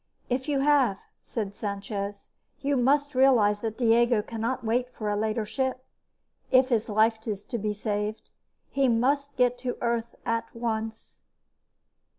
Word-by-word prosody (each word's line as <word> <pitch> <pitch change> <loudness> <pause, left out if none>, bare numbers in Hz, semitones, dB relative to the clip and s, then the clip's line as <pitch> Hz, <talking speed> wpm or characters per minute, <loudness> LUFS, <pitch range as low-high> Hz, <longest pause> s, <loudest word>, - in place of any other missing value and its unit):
"If 260 +4 -1
you 280 -2 +1
have," 275 -8 +3 0.2
said 205 -4 -4
Sanchez, 200 0 -5 0.3
"you 280 +1 0
must 285 +3 +2
realize 245 -6 +4
that 220 -1 -4
Diego 235 -2 +3
cannot 230 +3 -3
wait 245 +3 0
for 210 -3 -3
a - - 0
later 215 +1 -1
ship, 260 +2 -2 0.6
if 255 0 +5
his 225 -4 +1
life 220 +2 +2
is 205 -2 -3
to 235 - -4
be 210 +1 -1
saved. 210 0 -3 0.4
He 275 -1 +2
must 275 +4 +1
get 245 0 +2
to 250 -1 -3
Earth 235 -1 -1
at 230 0 -2
once." 225 -1 -4
230 Hz, 150 wpm, -27 LUFS, 215-255 Hz, 0.6 s, if